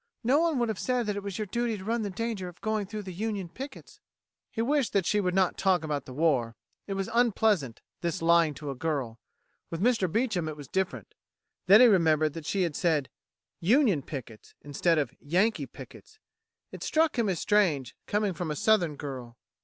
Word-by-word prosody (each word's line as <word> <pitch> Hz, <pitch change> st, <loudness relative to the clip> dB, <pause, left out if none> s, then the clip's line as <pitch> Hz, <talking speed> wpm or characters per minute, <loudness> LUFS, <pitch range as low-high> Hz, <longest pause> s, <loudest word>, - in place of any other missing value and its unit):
No 260 Hz, +6 st, +4 dB
one 330 Hz, -3 st, +1 dB
would 240 Hz, -1 st, +1 dB
have 215 Hz, -, -3 dB
said 250 Hz, -2 st, 0 dB
that 210 Hz, -1 st, -2 dB
it 205 Hz, -, -3 dB
was 200 Hz, -2 st, -5 dB
your 215 Hz, -, -2 dB
duty 235 Hz, +2 st, -1 dB
to 190 Hz, -, -9 dB
run 230 Hz, +3 st, -1 dB
the 205 Hz, -, -2 dB
danger 215 Hz, -2 st, -3 dB
of 175 Hz, -, -11 dB
going 215 Hz, -2 st, -1 dB
through 210 Hz, 0 st, -6 dB
the 190 Hz, -2 st, -7 dB
Union 205 Hz, -1 st, -3 dB
pickets." 265 Hz, +9 st, -10 dB, 0.5 s
He -, -, -8 dB
wished 280 Hz, 0 st, +1 dB
that 195 Hz, -3 st, +2 dB
she 210 Hz, +3 st, +2 dB
would 180 Hz, -1 st, -1 dB
not 190 Hz, -2 st, +2 dB
talk 185 Hz, -4 st, +2 dB
about 150 Hz, -3 st, -3 dB
the 130 Hz, -, -9 dB
war. 130 Hz, -7 st, +1 dB, 0.3 s
It 195 Hz, -, -3 dB
was 195 Hz, 0 st, -2 dB
unpleasant, 215 Hz, -, +2 dB, 0.2 s
this 170 Hz, +1 st, -2 dB
lying 165 Hz, -2 st, +3 dB
to 145 Hz, -2 st, -5 dB
a -, -, -6 dB
girl. 130 Hz, -5 st, -3 dB, 0.5 s
With 165 Hz, -, -4 dB
Mr. 220 Hz, -4 st, +2 dB
Beecham 215 Hz, -7 st, 0 dB
it 155 Hz, -, -7 dB
was 145 Hz, -2 st, -9 dB
different. 190 Hz, +5 st, -3 dB, 0.5 s
Then 200 Hz, +5 st, +8 dB
he -, -, +9 dB
remembered 155 Hz, -7 st, +3 dB
that 160 Hz, -1 st, -7 dB
she 195 Hz, -2 st, +1 dB
had 165 Hz, -4 st, -2 dB
said 155 Hz, -6 st, +1 dB, 0.5 s
"Union 210 Hz, -, +3 dB
pickets," 125 Hz, -6 st, -9 dB
instead 160 Hz, +4 st, +1 dB
of 145 Hz, -, -1 dB
"Yankee 185 Hz, +10 st, +1 dB
pickets." 435 Hz, -, -13 dB, 0.5 s
It -, -, -9 dB
struck 315 Hz, -5 st, +1 dB
him 220 Hz, -3 st, +2 dB
as 180 Hz, -4 st, -1 dB
strange, 175 Hz, -, +1 dB
coming 210 Hz, -2 st, 0 dB
from 175 Hz, -1 st, -4 dB
a 150 Hz, -, -2 dB
Southern 175 Hz, -4 st, +2 dB
girl. 130 Hz, -5 st, -7 dB
190 Hz, 205 wpm, -28 LUFS, 155-220 Hz, 0.5 s, he